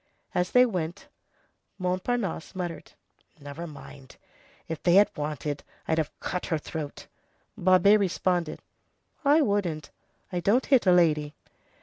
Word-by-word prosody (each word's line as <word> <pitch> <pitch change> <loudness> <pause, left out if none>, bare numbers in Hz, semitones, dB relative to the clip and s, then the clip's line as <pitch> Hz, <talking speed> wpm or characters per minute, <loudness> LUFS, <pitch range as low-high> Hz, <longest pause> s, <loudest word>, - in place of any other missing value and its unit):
As 180 0 0
they 250 0 +6
went, 175 -7 -4 0.7
Montparnasse 185 0 -2
muttered:— 175 -3 -5 0.5
"Never 145 +4 -7
mind! 140 -3 -12 0.5
if 160 - -5
they 175 0 +4
had 205 +1 +6
wanted, 150 -1 -4 0.2
I'd 160 0 +1
have 155 - -1
cut 180 - -3
her 160 - 0
throat." 150 -1 -6 0.5
Babet 185 +3 +5
responded 180 -4 -1 0.6
"I 295 +3 +5
wouldn't. 185 - -1 0.4
I 180 - -1
don't 210 +9 +2
hit 260 -7 +3
a - - +7
lady." 155 -4 +3
175 Hz, 125 wpm, -27 LUFS, 155-195 Hz, 0.7 s, a